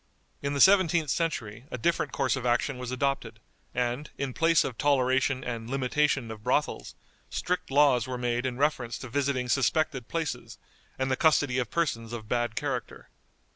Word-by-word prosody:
In 140 Hz, 0 st, -2 dB
the -, -, -1 dB
seventeenth 175 Hz, -5 st, +5 dB
century 120 Hz, -9 st, -2 dB
a -, -, -4 dB
different 170 Hz, +8 st, 0 dB
course 135 Hz, -2 st, +1 dB
of 130 Hz, -, -5 dB
action 125 Hz, +2 st, 0 dB
was 125 Hz, -1 st, -5 dB
adopted, 135 Hz, +2 st, -2 dB, 0.3 s
and, 125 Hz, +4 st, -2 dB
in 135 Hz, -2 st, -3 dB
place 165 Hz, +2 st, +4 dB
of 125 Hz, -, -4 dB
toleration 130 Hz, -1 st, +2 dB
and 115 Hz, -2 st, -5 dB
limitation 135 Hz, -2 st, 0 dB
of 110 Hz, -1 st, -9 dB
brothels, -, -, -1 dB, 0.3 s
strict 180 Hz, 0 st, -2 dB
laws 135 Hz, -3 st, +4 dB
were 130 Hz, -1 st, -3 dB
made 120 Hz, +1 st, -1 dB
in 125 Hz, -1 st, -4 dB
reference 130 Hz, -5 st, 0 dB
to 130 Hz, -, -8 dB
visiting 135 Hz, -1 st, 0 dB
suspected 135 Hz, -1 st, +1 dB
places, 165 Hz, -2 st, -4 dB, 0.4 s
and 130 Hz, 0 st, -1 dB
the -, -, +3 dB
custody 145 Hz, -4 st, +3 dB
of 125 Hz, -, -2 dB
persons 115 Hz, -9 st, -1 dB
of 110 Hz, -2 st, -6 dB
bad 120 Hz, -1 st, -1 dB
character. -, -, -4 dB
130 Hz, 170 wpm, -28 LUFS, 120-145 Hz, 0.4 s, seventeenth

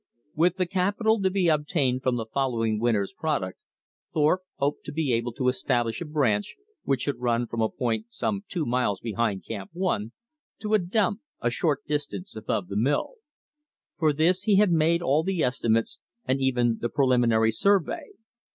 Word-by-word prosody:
With 170 Hz, +3 st, +2 dB
the 185 Hz, -, +1 dB
capital 200 Hz, +4 st, +1 dB
to 190 Hz, -, +3 dB
be 185 Hz, -2 st, +1 dB
obtained 150 Hz, -4 st, +1 dB
from 130 Hz, -1 st, +1 dB
the 115 Hz, -2 st, -3 dB
following 115 Hz, -3 st, 0 dB
winter's 110 Hz, -2 st, +1 dB
product, 135 Hz, -, -2 dB, 0.5 s
Thorpe 155 Hz, +4 st, +2 dB
hoped 140 Hz, +1 st, -1 dB
to -, -, -5 dB
be 145 Hz, -4 st, 0 dB
able 120 Hz, +1 st, 0 dB
to 130 Hz, +1 st, -1 dB
establish 120 Hz, -2 st, +1 dB
a -, -, -3 dB
branch 135 Hz, -10 st, 0 dB, 0.3 s
which 135 Hz, -1 st, 0 dB
should 145 Hz, -, -2 dB
run 120 Hz, -1 st, +1 dB
from 115 Hz, -1 st, -4 dB
a 110 Hz, -, +2 dB
point 115 Hz, -3 st, -2 dB
some 200 Hz, -, -2 dB
two 170 Hz, -5 st, -2 dB
miles 120 Hz, -6 st, 0 dB
behind 115 Hz, -4 st, -2 dB
Camp 100 Hz, -4 st, -6 dB
One, 170 Hz, -, -1 dB, 0.5 s
to 215 Hz, 0 st, -3 dB
a 215 Hz, -, +6 dB
"dump" 200 Hz, +3 st, 0 dB, 0.2 s
a 120 Hz, -, 0 dB
short 145 Hz, +2 st, 0 dB
distance 150 Hz, +6 st, -3 dB
above 105 Hz, -3 st, -2 dB
the 100 Hz, -, -6 dB
mill. 140 Hz, -, +1 dB, 0.9 s
For 155 Hz, -3 st, +4 dB
this 165 Hz, +5 st, +2 dB
he 205 Hz, 0 st, +3 dB
had 200 Hz, -1 st, +4 dB
made 165 Hz, +1 st, +3 dB
all 145 Hz, 0 st, +3 dB
the 185 Hz, 0 st, -1 dB
estimates, 115 Hz, -3 st, 0 dB, 0.3 s
and 135 Hz, +1 st, 0 dB
even 120 Hz, -3 st, +1 dB
the 120 Hz, -, -1 dB
preliminary 120 Hz, -5 st, +3 dB
survey. 195 Hz, -, +2 dB
135 Hz, 175 wpm, -26 LUFS, 115-170 Hz, 0.9 s, a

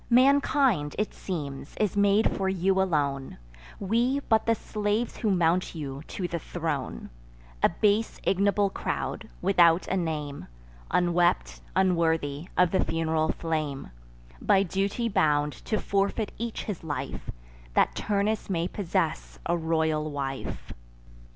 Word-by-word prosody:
Mankind, 255 Hz, -, +4 dB
it 210 Hz, +2 st, -1 dB
seems, 145 Hz, -6 st, -6 dB
is 210 Hz, -3 st, 0 dB
made 205 Hz, +1 st, +3 dB
for 190 Hz, -1 st, 0 dB
you 190 Hz, +1 st, +2 dB
alone; 145 Hz, -7 st, -1 dB, 0.4 s
We, 235 Hz, +7 st, +1 dB
but 220 Hz, -4 st, +1 dB
the 230 Hz, -, +4 dB
slaves 210 Hz, +2 st, -2 dB
who 220 Hz, -, 0 dB
mount 175 Hz, -1 st, +2 dB
you 140 Hz, -3 st, -5 dB
to 185 Hz, -, -3 dB
the 170 Hz, -1 st, -3 dB
throne: 145 Hz, -, -4 dB, 0.5 s
A -, -, +5 dB
base 210 Hz, +5 st, +1 dB
ignoble 200 Hz, +1 st, +2 dB
crowd, -, -, -3 dB
without 170 Hz, -2 st, +4 dB
a -, -, 0 dB
name, 155 Hz, -5 st, -3 dB, 0.4 s
Unwept, 175 Hz, 0 st, +2 dB
unworthy, 165 Hz, -5 st, +1 dB
of 180 Hz, -1 st, +4 dB
the 190 Hz, -, +2 dB
fun'ral 160 Hz, -1 st, 0 dB
flame, 155 Hz, -, -3 dB, 0.5 s
By 195 Hz, -, +4 dB
duty 200 Hz, +5 st, -1 dB
bound 150 Hz, -7 st, +2 dB
to 215 Hz, -, 0 dB
forfeit 200 Hz, +2 st, 0 dB
each 235 Hz, -1 st, -3 dB
his 200 Hz, -6 st, -5 dB
life, 150 Hz, -3 st, -5 dB, 0.5 s
That -, -, +4 dB
Turnus 205 Hz, +1 st, -1 dB
may 170 Hz, -2 st, 0 dB
possess 185 Hz, -4 st, -2 dB
a 170 Hz, -, +1 dB
royal 160 Hz, -2 st, 0 dB
wife. 135 Hz, -2 st, -5 dB
180 Hz, 130 wpm, -27 LUFS, 160-205 Hz, 0.5 s, A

